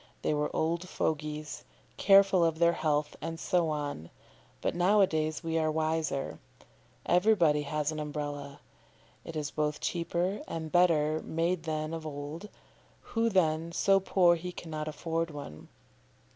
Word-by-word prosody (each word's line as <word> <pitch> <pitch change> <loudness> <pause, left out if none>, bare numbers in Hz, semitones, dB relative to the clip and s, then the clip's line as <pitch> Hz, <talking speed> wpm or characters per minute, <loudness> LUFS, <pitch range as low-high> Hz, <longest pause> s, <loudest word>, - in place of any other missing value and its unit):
They - - +1
were 150 0 0
old 170 +3 -1
fogies, 150 0 -3 0.3
careful 195 -2 +5
of 165 -1 +1
their 170 0 +4
health, 150 -2 0
and 165 +1 -5
so 175 -2 +1
on; 145 - -4 0.5
but - - -1
now 185 +4 +3
a - - +7
days 155 -1 -2
we 165 0 0
are 155 0 +1
wiser. 155 -3 -1 0.7
Everybody 175 -6 +4
has 150 +1 -2
his 155 -1 -3
Umbrella. 145 -1 -5 0.6
It 165 - -8
is 150 -2 -3
both 150 -1 -1
cheaper 175 - -1
and 160 -1 -5
better 160 -3 +3
made 165 +1 -1
than 155 0 -2
of 160 -1 -5
old; 150 +7 -6 0.6
who, 230 0 +2
then, 165 -4 +1
so 195 +3 +3
poor 185 -2 +4
he 180 +2 -6
cannot 155 -3 -6
afford 165 +1 -2
one? 140 - -9
160 Hz, 145 wpm, -30 LUFS, 150-175 Hz, 0.7 s, a